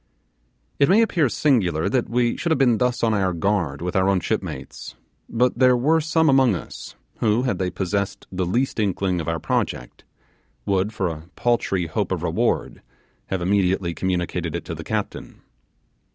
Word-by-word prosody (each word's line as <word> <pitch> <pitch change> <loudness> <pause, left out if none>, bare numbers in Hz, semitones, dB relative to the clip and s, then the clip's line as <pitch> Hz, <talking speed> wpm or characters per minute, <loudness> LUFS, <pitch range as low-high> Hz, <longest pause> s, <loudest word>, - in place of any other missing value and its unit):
It 140 - +4
may 215 +5 +6
appear 165 - +1
singular 100 - +1
that 120 +4 0
we 120 0 +1
should 170 - -2
have 160 - +3
been 125 -4 +3
thus 125 -1 0
on 115 -1 +3
our 95 -3 +1
guard 85 -5 -1
with 90 - -3
our 95 0 +3
own 95 -1 +2
shipmates; - - -5 0.3
but 125 +1 +1
there 125 -1 +5
were 155 +6 +3
some 160 +1 +2
among 135 -6 +4
us - - -8 0.2
who, 110 +2 +2
had 120 -8 -1
they 95 -1 0
possessed 100 +2 -3
the 90 -1 -2
least 120 +6 0
inkling 95 -3 0
of 80 - -7
our 80 0 0
project, - - -3 0.6
would, 100 +1 +1
for 100 -4 -1
a 80 0 -7
paltry 105 -7 0
hope 80 - -2
of - - -2
reward, - - -1 0.5
have 95 -2 -2
immediately 95 -2 +1
communicated 90 -2 -2
it - - -5
to - - -5
the - - -7
captain. - - -5
100 Hz, 175 wpm, -23 LUFS, 90-125 Hz, 0.6 s, may